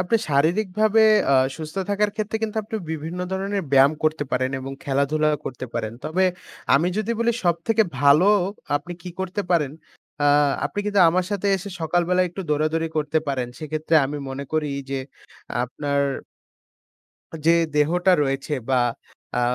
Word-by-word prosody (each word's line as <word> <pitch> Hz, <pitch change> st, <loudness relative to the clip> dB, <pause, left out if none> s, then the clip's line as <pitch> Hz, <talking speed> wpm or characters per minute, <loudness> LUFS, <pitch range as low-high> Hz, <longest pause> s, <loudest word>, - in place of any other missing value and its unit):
আপনি 185 Hz, +5 st, +2 dB
শারীরিকভাবে 195 Hz, +9 st, +2 dB, 0.3 s
আ -, -, +4 dB, 0.2 s
সুস্থ 155 Hz, +2 st, -8 dB
থাকার 205 Hz, +1 st, +1 dB
ক্ষেত্রে 215 Hz, 0 st, -2 dB
কিন্তু 220 Hz, -1 st, -2 dB
আপনি 215 Hz, +1 st, -5 dB
বিভিন্ন 160 Hz, +2 st, -5 dB
ধরনের 195 Hz, +1 st, -2 dB
ব্যায়াম 135 Hz, +1 st, +6 dB
করতে 155 Hz, -1 st, +1 dB
পারেন। 130 Hz, 0 st, +1 dB
এবং 135 Hz, +1 st, -6 dB
খেলাধুলা 145 Hz, +2 st, +1 dB, 0.2 s
করতে 130 Hz, 0 st, -5 dB
পারেন। 110 Hz, -, -2 dB
তবে 170 Hz, +5 st, +1 dB, 0.5 s
আমি 160 Hz, +6 st, +3 dB
যদি 215 Hz, +1 st, -2 dB
বলি 235 Hz, 0 st, +2 dB
সবথেকে 175 Hz, +6 st, +2 dB, 0.2 s
ভালো 145 Hz, +5 st, +5 dB, 0.5 s
আপনি 160 Hz, +5 st, -7 dB
কি 180 Hz, -, -7 dB
করতে 190 Hz, +2 st, -2 dB
পারেন? 150 Hz, -6 st, +2 dB, 0.5 s
আ -, -, +3 dB, 0.4 s
আপনি -, -, -4 dB
কিন্তু 205 Hz, -1 st, +2 dB
আমার 180 Hz, +2 st, +1 dB
সাথে 205 Hz, -1 st, -2 dB
এসে 195 Hz, +2 st, -7 dB
সকালবেলা 175 Hz, +2 st, +1 dB
একটু 175 Hz, +3 st, -7 dB
দৌড়া-দৌড়ি 155 Hz, +2 st, 0 dB
করতে 150 Hz, +1 st, +1 dB
পারেন। 130 Hz, -3 st, -1 dB
সেক্ষেত্রে 155 Hz, +1 st, -2 dB
আমি 145 Hz, +2 st, -4 dB
মনে 135 Hz, +1 st, -5 dB
করি 155 Hz, -1 st, +1 dB, 0.2 s
যে 135 Hz, -, -1 dB, 0.7 s
আপনার 140 Hz, +3 st, -2 dB, 1.5 s
যে 165 Hz, -, +7 dB, 0.2 s
দেহটা 175 Hz, +5 st, +3 dB
রয়েছে 135 Hz, +2 st, -1 dB, 0.2 s
বা 130 Hz, -2 st, +3 dB, 0.6 s
আ -, -, +2 dB
160 Hz, 150 wpm, -23 LUFS, 145-190 Hz, 1.5 s, যে